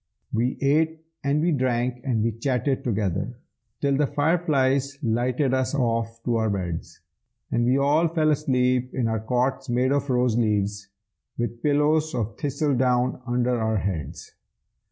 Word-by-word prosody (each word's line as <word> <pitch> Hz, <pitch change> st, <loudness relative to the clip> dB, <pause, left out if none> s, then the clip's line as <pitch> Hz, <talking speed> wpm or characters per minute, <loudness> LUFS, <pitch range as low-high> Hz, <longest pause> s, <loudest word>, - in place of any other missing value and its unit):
We 120 Hz, +3 st, 0 dB
ate 160 Hz, +3 st, +1 dB, 0.2 s
and 140 Hz, +2 st, +1 dB
we 175 Hz, -, +2 dB
drank 125 Hz, -3 st, 0 dB
and 120 Hz, -6 st, 0 dB
we 115 Hz, -, +1 dB
chatted 130 Hz, +3 st, -1 dB
together, 105 Hz, +1 st, -2 dB, 0.4 s
Till 140 Hz, -1 st, +2 dB
the 145 Hz, -1 st, +2 dB
fireflies 140 Hz, -4 st, +1 dB
lighted 125 Hz, +3 st, +1 dB
us 130 Hz, +2 st, 0 dB
off 115 Hz, -3 st, -1 dB
to 120 Hz, -1 st, +1 dB
our 110 Hz, -1 st, +1 dB
beds; 90 Hz, -4 st, -4 dB, 0.5 s
And 120 Hz, -, +1 dB
we 125 Hz, +2 st, +3 dB
all 145 Hz, +4 st, +3 dB
fell 155 Hz, -2 st, +2 dB
asleep 125 Hz, -3 st, +1 dB
in 125 Hz, -3 st, +1 dB
our 110 Hz, -1 st, 0 dB
cots 125 Hz, +4 st, -1 dB
made 125 Hz, +2 st, +2 dB
of 140 Hz, 0 st, 0 dB
rose 125 Hz, -2 st, +2 dB
leaves, 105 Hz, -3 st, 0 dB, 0.5 s
With 120 Hz, 0 st, -3 dB
pillows 150 Hz, +2 st, +2 dB
of 115 Hz, -1 st, -2 dB
thistledown 130 Hz, -4 st, +1 dB
under 120 Hz, 0 st, +1 dB
our 110 Hz, -1 st, +1 dB
heads. 90 Hz, -8 st, -4 dB
125 Hz, 150 wpm, -25 LUFS, 115-140 Hz, 0.5 s, we